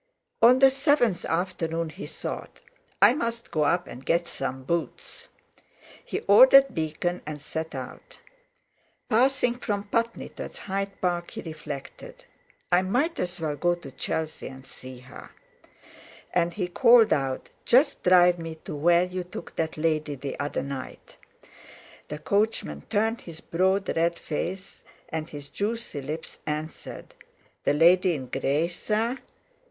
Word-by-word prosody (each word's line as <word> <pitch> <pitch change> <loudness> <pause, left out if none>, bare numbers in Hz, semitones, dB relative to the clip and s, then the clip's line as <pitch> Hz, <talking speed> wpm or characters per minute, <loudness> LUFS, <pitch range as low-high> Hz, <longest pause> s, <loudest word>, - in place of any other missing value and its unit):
On 240 +2 +8
the 270 0 +7
seventh 270 - +2
afternoon 165 -2 -1
he 180 +6 -8
thought: - - -6 0.4
"I 205 +4 +8
must 235 -4 -3
go 155 -2 +1
up 175 +4 +2
and 125 - -10
get 170 +4 +1
some 130 -3 -4
boots." 170 +4 -4 0.7
He - - -4
ordered 260 +6 +7
Beacon, 170 +2 -2
and 150 -1 -5
set 160 +1 -5
out. 130 -1 -8 0.9
Passing 245 +1 +2
from 205 -4 -2
Putney 230 +1 -1
towards - - -8
Hyde 195 0 -4
Park 175 -1 0
he - - -7
reflected: 155 -4 -8 0.5
"I 175 +1 +5
might 250 - 0
as 175 0 -3
well 155 -2 -2
go 175 +4 +1
to 170 -6 -11
Chelsea 160 +4 -3
and 130 0 -11
see 130 -1 -11
her." 130 +2 -12 1.0
And 170 -1 +1
he 185 -4 -1
called 235 +4 +6
out: 135 -2 -2
"Just 260 +6 +4
drive 180 -1 +5
me 165 -1 -6
to - - -5
where 170 +4 +4
you 180 0 -4
took 175 -1 -9
that 160 -1 -2
lady 155 -2 0
the 135 +1 -6
other 145 0 -2
night." 135 -2 -8 0.9
The 150 - -5
coachman 200 - -1
turned 225 +3 +1
his 165 -2 -10
broad 190 +4 0
red 170 +1 +1
face, 185 +5 -5 0.3
and 160 0 -4
his 145 -1 -9
juicy 210 -7 -3
lips 155 +4 -6
answered: 155 +1 -5 0.5
"The - - +3
lady 175 +3 +5
in 130 -4 -6
grey, 140 +4 +1
sir?" 225 +8 -1
175 Hz, 145 wpm, -26 LUFS, 155-205 Hz, 1.0 s, On